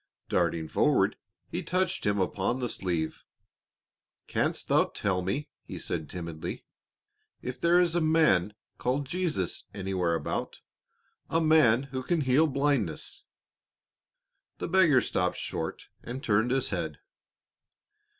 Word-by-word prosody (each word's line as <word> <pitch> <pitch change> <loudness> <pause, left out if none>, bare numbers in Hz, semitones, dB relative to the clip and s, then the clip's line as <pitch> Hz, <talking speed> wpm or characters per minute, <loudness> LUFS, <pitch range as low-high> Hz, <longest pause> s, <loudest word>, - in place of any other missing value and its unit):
Darting 85 -2 +1
forward, - - +2 0.3
he - - -3
touched 185 - 0
him 100 0 +2
upon 95 +5 0
the 125 -2 -2
sleeve. 85 -6 -2 1.0
"Canst - - -1
thou - - +4
tell 95 -2 -1
me," 135 +12 -2
he - - -8
said 80 -2 -3
timidly, 85 -3 -6 0.8
"if 125 +1 -5
there 170 +1 +5
is 175 -2 +3
a 175 - +2
man 155 - +3 0.2
called 135 +3 0
Jesus 160 - -2
anywhere 95 -3 0
about 80 - -3 0.7
a 165 - +2
man 155 -7 +5
who 135 -1 -5
can 160 +5 0
heal 140 +4 +4
blindness?" 140 - -1 1.3
The - - -3
beggar 170 -8 +5
stopped 90 0 0
short - - -4
and 125 +3 -6
turned 110 +2 +2
his 135 0 +1
head. - - -3
125 Hz, 125 wpm, -29 LUFS, 90-155 Hz, 1.3 s, there